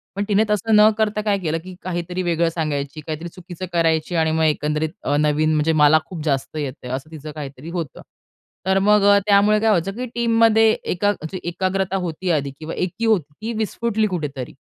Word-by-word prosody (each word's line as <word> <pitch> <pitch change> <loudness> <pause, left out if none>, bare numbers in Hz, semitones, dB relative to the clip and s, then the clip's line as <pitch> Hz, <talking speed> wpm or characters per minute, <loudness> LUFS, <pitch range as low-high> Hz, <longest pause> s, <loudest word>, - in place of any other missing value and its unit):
पण 200 - -1
तिने 210 0 +3
तसं 215 +1 +2
न 210 +1 +7
करता 215 -1 0
काय 205 -2 +1
केलं, 165 -3 -1
की 185 0 -10
काहीतरी 180 0 -3
वेगळं 170 -1 +1
सांगायची, 155 -2 -3
काहीतरी 160 +2 -4
चुकीचं 180 0 -8
करायची 165 0 +1
आणि 160 -1 +2
मग 160 0 +1
एकंदरीत 150 0 0
अ, 145 - 0
नवीन 150 +1 +2
म्हणजे 155 +2 +2
मला 155 +2 +6
खूप 165 -5 -7
जास्त 140 +1 -1
येतंय 130 -4 -5
असं 135 +5 -5
तिचं 155 -1 -8
काहीतरी 145 0 -8
होतं. 170 -5 -5 0.6
तर 190 0 +3
मग 210 +1 +4 0.2
त्यामुळे 205 +1 +5
काय 220 +1 +2
व्हायचं 195 -2 +1
की 250 +2 -4
टीममध्ये 225 -2 +4
एका 205 +3 0
म्हणजे 185 -1 -6
एकाग्रता 190 +2 -1
होती 180 -1 -3
आधी 140 -3 0
किंवा 160 +1 -6
एकी 185 +6 -2
होती 175 -10 +1
ती 225 +2 -3
विस्फुटली 220 0 0
कुठेतरी. 150 - -4
175 Hz, 190 wpm, -21 LUFS, 155-205 Hz, 0.6 s, न